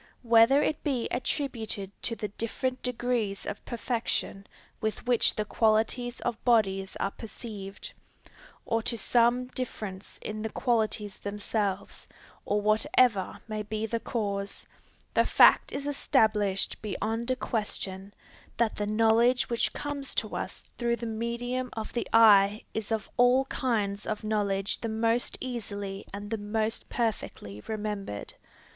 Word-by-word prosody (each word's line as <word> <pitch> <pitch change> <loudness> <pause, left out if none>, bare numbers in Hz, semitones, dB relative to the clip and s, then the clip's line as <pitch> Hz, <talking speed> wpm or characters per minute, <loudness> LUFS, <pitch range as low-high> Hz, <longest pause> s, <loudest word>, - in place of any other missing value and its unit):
Whether 235 +5 +6
it 310 - -1
be 260 -5 0
attributed 230 -6 -2
to 230 - -2
the 210 -2 -4
different 255 +4 -3
degrees 240 -5 -1
of 205 - -5
perfection 230 -4 -2 0.3
with 220 +2 -3
which 245 -2 +3
the 215 - -1
qualities 225 +3 +1
of 240 -2 -3
bodies 195 -5 +2
are 195 - 0
perceived, 205 -3 -8 0.7
or 225 -1 +1
to 235 +1 -3
some 240 +3 +3
difference 215 -7 -5
in 215 0 -4
the 220 - -2
qualities 220 -4 0
themselves, 205 -1 -3 0.4
or 205 - +1
whatever 215 0 +2
may 215 -1 -3
be 215 +1 -3
the 230 +1 -1
cause, 200 -4 -3 0.5
the - - +5
fact - - +6
is 280 0 -4
established 215 -9 +1
beyond 225 +3 -2
a 255 - +2
question, 200 -4 -3 0.5
that 230 -2 +1
the 205 - -1
knowledge 225 +4 +3
which 235 - +2
comes 290 -1 -4
to - - -1
us - - -4 0.2
through 235 -1 +2
the 235 - -6
medium 235 +3 -2
of 220 -1 -5
the 240 - -1
eye 210 -2 +6
is 220 0 -4
of 220 -1 -1
all 250 +2 +5
kinds 210 -7 -1
of 215 0 -2
knowledge 205 -2 0
the 230 - -2
most 230 +2 +1
easily 205 -5 -5
and 205 +1 -7
the 225 - -1
most 215 +2 -2
perfectly 155 - -3
remembered. 205 - -4
220 Hz, 140 wpm, -29 LUFS, 205-240 Hz, 0.7 s, Whether